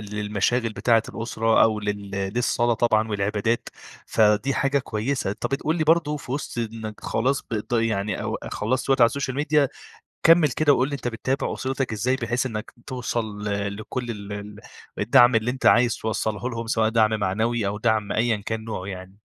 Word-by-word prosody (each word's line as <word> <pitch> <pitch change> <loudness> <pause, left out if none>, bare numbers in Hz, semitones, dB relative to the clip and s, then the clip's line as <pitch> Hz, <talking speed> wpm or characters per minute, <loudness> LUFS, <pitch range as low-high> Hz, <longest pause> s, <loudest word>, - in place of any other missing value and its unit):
للمشاغل 105 +3 -1
بتاعة 115 +1 +3
الأسرة 115 0 +1
أو 110 -1 +3
لل 105 -1 -4 0.2
للصلاة 120 -1 +1
طبعًا 110 -1 +2
والعبادات، 105 +2 -1 0.4
فدي 110 +5 +3
حاجة 140 0 +1
كويسة. 120 -1 -2
أنت 105 - -3
بتقول 150 +4 -1
لي 155 - 0
برضه 160 -2 +3
في 130 -3 -7
وِسط 140 -3 -4
إنّك 110 -2 -5
خلاص 130 +5 0
بت 110 0 -4
يعني 110 -3 0
أو - - -3
خلَّصت 130 +6 -1
وقت 135 -1 +3
على 115 - +9
السوشيال 130 0 -3
ميديا 150 -1 +2 0.5
كمِّل 165 -2 +6
كده 145 +3 +3
وقل 130 -1 +2
لي 145 - -4
أنت 125 -3 -3
بتتابع 130 +3 -2
أسرتك 130 -2 -2
إزاي 125 +5 0
بحيث 125 -1 -1
إنّك 110 -4 -6
توصل 115 -5 -3
ل 100 0 -2
لكل 120 +3 -5
ال 105 -2 -6
ال 105 0 -7 0.4
الدعم 120 +2 +5
اللي 115 +2 +2
أنت 130 +1 -3
عايز 120 -1 +5
توصّله 110 +1 -2
لهم 115 -1 -5
سواء 110 -1 +2
دعم 110 -1 +2
معنوي 110 +3 0
أو 100 +1 -2
دعم 110 -2 +1
أيًا 115 0 +1
كان 110 +2 -5
نوعه 105 -4 -5
يعني؟ 95 0 -8
115 Hz, 180 wpm, -24 LUFS, 105-130 Hz, 0.5 s, على